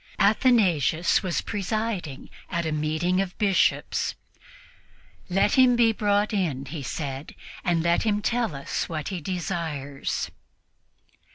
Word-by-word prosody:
Athanasius 195 - +3
was 185 -4 -1
presiding 205 -7 -3 0.2
at 170 0 -1
a 160 - -1
meeting 155 +5 0
of 185 -2 -5
Bishops. 200 -3 +1 1.1
"Let 195 +3 +3
him 255 -1 +6
be 235 -1 +5
brought 205 0 +1
in," 155 -10 -1
he 145 +2 -6
said, 135 +1 -5 0.3
"and 170 -2 +1
let 170 0 +3
him 210 -2 +1
tell 235 -9 0
us 140 - -3
what 155 -3 -3
he 185 -3 -4
desires." 160 -5 -3
175 Hz, 120 wpm, -25 LUFS, 155-205 Hz, 1.1 s, him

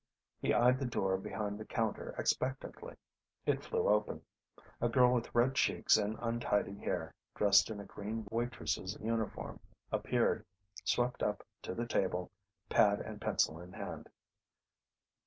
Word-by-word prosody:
He - - +2
eyed 125 +2 +5
the 135 - -1
door 95 -5 +1
behind 105 +2 -3
the 110 - -6
counter 115 -3 -2
expectantly. 130 +1 -2 0.5
It - - +1
flew - - 0
open. 105 0 +2 0.6
A 120 - +3
girl 125 0 +5
with 120 -1 -1
red 120 +3 +4
cheeks 155 +2 +4
and 105 0 0
untidy 115 -4 0
hair, - - -3 0.2
dressed 100 0 +5
in 110 -2 -5
a 100 - -7
green 110 +3 -5
waitress' 110 -4 -2
uniform 115 0 -2 0.3
appeared, - - +1 0.4
swept 125 +1 +1
up 105 -1 -1 0.2
to - - -5
the 120 - -1
table, 90 -5 0 0.4
pad 105 -1 +4
and - - -7
pencil 80 - +1
in 90 +2 -11
hand. - - -6
110 Hz, 140 wpm, -34 LUFS, 100-120 Hz, 0.6 s, eyed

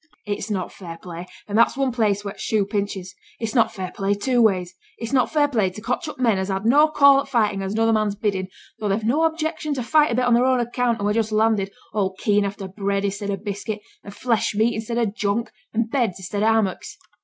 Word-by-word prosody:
It's 205 +2 -3
not 190 -4 -2
fair 170 -3 -9
play, 175 +1 -8 0.2
and 205 - -4
that's 230 +3 +4
one 270 -2 +1
place 210 -4 0
where 200 - -4
t' - - -20
shoe 215 -3 +1
pinches. 200 -2 -3 0.3
It's 225 -2 -3
not 235 -4 +3
fair 185 -3 -5
play 200 0 0
two 245 +4 +1
ways. 185 -5 +2 0.2
It's 230 +3 -5
not 255 -2 +3
fair 295 -2 +3
play 220 -9 +1
to 185 - -10
cotch 250 +9 -2
up 305 - -7
men 230 -6 +2
as 190 - -2
has 195 0 -2
no 290 +6 +6
call 280 -2 +5
for - - -16
fightin' 210 -5 +1
at 190 - -3
another 225 +2 +2
man's 215 -2 +1
biddin', 195 -3 -1 0.3
though 210 - -2
they've 205 +3 0
no 285 +9 +2
objection 315 -2 -1
to 255 - -2
fight 300 +2 +3
a - - 0
bit 250 +1 +1
on 245 - +3
their 240 +1 +4
own 260 -1 +3
account 240 0 0
and - - -8
who - - +2
are - - +1
just 220 0 -5
landed, 215 -2 +2 0.2
all 195 -3 0
keen 205 0 +2
after 200 0 -5
bread 200 +1 -2
i'stead 200 +1 -3
o' 200 - -1
biscuit, 205 +2 -5 0.2
and 200 0 -10
flesh 230 -4 0
meat 225 +3 +2
i'stead 225 +2 -3
o' 235 - +2
junk, 210 +1 -2 0.2
and 225 0 -1
beds 235 -9 0
i'stead 195 +2 -4
o' 215 - +3
hammocks. 215 -4 -1
215 Hz, 245 wpm, -23 LUFS, 200-240 Hz, 0.3 s, no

